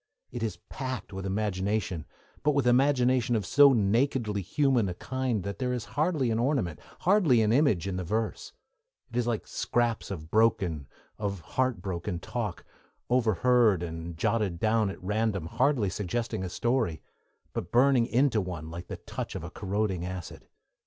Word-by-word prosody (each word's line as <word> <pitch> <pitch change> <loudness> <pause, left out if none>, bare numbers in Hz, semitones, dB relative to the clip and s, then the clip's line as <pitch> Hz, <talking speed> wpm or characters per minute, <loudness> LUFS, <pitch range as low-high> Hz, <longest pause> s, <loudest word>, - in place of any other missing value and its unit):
It 120 - -5
is 110 -6 -2
packed 130 -8 -5
with 95 0 -4
imagination, 95 -3 -1 0.3
but 150 - +2
with 140 -3 +2
imagination 125 -1 +3
of 105 -4 -1
so 140 +7 +7
nakedly 115 -1 +1
human 120 - +2
a 90 - -4
kind 130 -3 -2
that 100 0 -5
there 125 -1 0
is 125 -3 -3
hardly 150 -5 +1
an 110 - 0
ornament, 120 - 0 0.2
hardly 180 - +4
an 105 +1 +2
image, 120 - +3
in 95 -2 -2
the 95 - -2
verse: 110 +5 -2 0.6
it 120 - -4
is 120 -1 +1
like 115 -3 -1
scraps 120 -2 -1
of 80 -4 -7
broken, 95 - +2 0.3
of 100 -3 -3
heart 130 +8 -1
broken, 90 -2 -3
talk, 105 +1 -4 0.5
overheard 115 -4 +3
and 80 0 -6
jotted 105 -3 0
down 110 0 +2
at 95 - -7
random, 105 -2 0
hardly 115 - +1
suggesting 110 +1 -2
a 95 - -3
story, 115 -5 0 0.5
but 85 - -4
burning 125 -1 +4
into 125 -3 +2
one 85 -4 -6
like 85 +2 -7
the - - -6
touch - - -6
of - - -5
a - - -7
corroding 100 -2 -1
acid. 90 -1 -7
110 Hz, 165 wpm, -28 LUFS, 95-125 Hz, 0.6 s, so